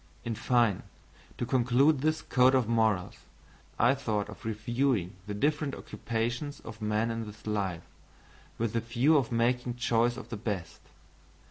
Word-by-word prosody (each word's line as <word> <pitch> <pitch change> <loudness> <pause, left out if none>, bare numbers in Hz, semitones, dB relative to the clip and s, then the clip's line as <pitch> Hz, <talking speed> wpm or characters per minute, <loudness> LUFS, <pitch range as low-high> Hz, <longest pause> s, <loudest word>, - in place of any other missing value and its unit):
In 115 - -1
fine, 115 -3 +2 0.6
to - - -2
conclude 130 +4 +3
this 155 +1 0
code 130 +1 +4
of 125 -4 +2
morals, 110 -5 +1 0.6
I 120 +3 +5
thought 110 -7 -2
of 105 - -11
reviewing 110 -2 0
the 105 - -3
different 150 +4 0
occupations 120 +5 -3
of 110 0 -10
men 110 +2 0
in 115 -1 -4
this 105 0 -12
life, 100 -5 -2 0.7
with 115 -2 -1
the 115 - +2
view 120 +7 +2
of 135 -6 +2
making 120 +1 +1
choice 120 0 +1
of 120 - -9
the 115 - -4
best. 100 -6 -4
115 Hz, 150 wpm, -29 LUFS, 110-125 Hz, 0.7 s, I